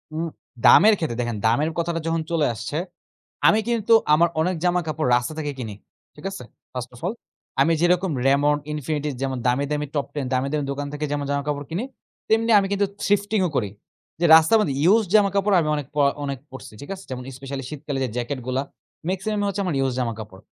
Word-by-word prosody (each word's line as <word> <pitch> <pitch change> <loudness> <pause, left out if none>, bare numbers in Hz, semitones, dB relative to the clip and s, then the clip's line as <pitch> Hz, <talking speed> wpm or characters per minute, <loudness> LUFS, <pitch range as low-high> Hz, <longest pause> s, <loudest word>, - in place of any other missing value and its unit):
উম 165 +1 -1 0.4
দামের 215 +4 +8
ক্ষেত্রে 155 -10 -3
দেখেন, 120 -2 -2
দামের 140 +8 +2
কথাটা 170 0 -1
যখন 165 0 0
চলে 165 -3 +2
আসছে, 115 +6 -5 0.7
আমি 215 - +5
কিন্তু 230 -2 +2 0.2
আমার 170 +3 +5
অনেক 180 +3 0
জামাকাপড় 160 -5 0
রাস্তা 125 +5 -1
থেকে 150 -2 -2
কিনি। 110 -5 -5 0.4
ঠিক 150 - -13
আছে? 195 - -7 0.3
ফার্স্ট 125 -1 -5
অফ 120 - -14
অল 195 - -1 0.5
আমি 165 - +4
যেরকম 180 +1 +2
Raymond, 145 +2 +3
Infinity, 150 0 -2
যেমন 135 -1 -1
দামি, 125 +3 +2
দামি, 150 0 -1
Top 145 - 0
Ten 145 -2 -2
দামি, 130 +1 +1
দামি, 150 -2 -1
দোকান 145 +1 -4
থেকে 150 +1 -2
যেমন 145 -1 -1
জামাকাপড় 145 0 -2
কিনি। 180 +8 -2 0.5
তেমনি 225 +1 +3
আমি 195 - -1
কিন্তু 200 0 +2 0.2
থ্রিফটিং 205 +1 +1
ও - - -4
করি। 105 -6 0 0.5
যে 170 - +2
রাস্তার 160 +7 +6
মধ্যে 145 -10 0
ইউজ 210 +7 +5
জামাকাপড় 200 -1 +3
আমি 155 - -1
অনেক 145 -3 -4
পরা 140 -1 +4
অনেক 140 -1 -3
পড়ছি। 130 -4 -10
ঠিক 145 - -10
আছে? 190 - -12
যেমন 125 -1 -5
স্পেশালি 135 0 -6
শীতকালে 145 -2 -4
যে 130 - -1
জ্যাকেট 125 +3 -3
গুলা 130 +1 0 0.5
মেক্সিমাম 195 +3 -2
ই - - +1
হচ্ছে 200 +1 -2
আমার 175 -5 -1
ইউজ 135 -1 +1
জামাকাপড়। 110 -5 -4
150 Hz, 200 wpm, -23 LUFS, 135-180 Hz, 0.7 s, দামের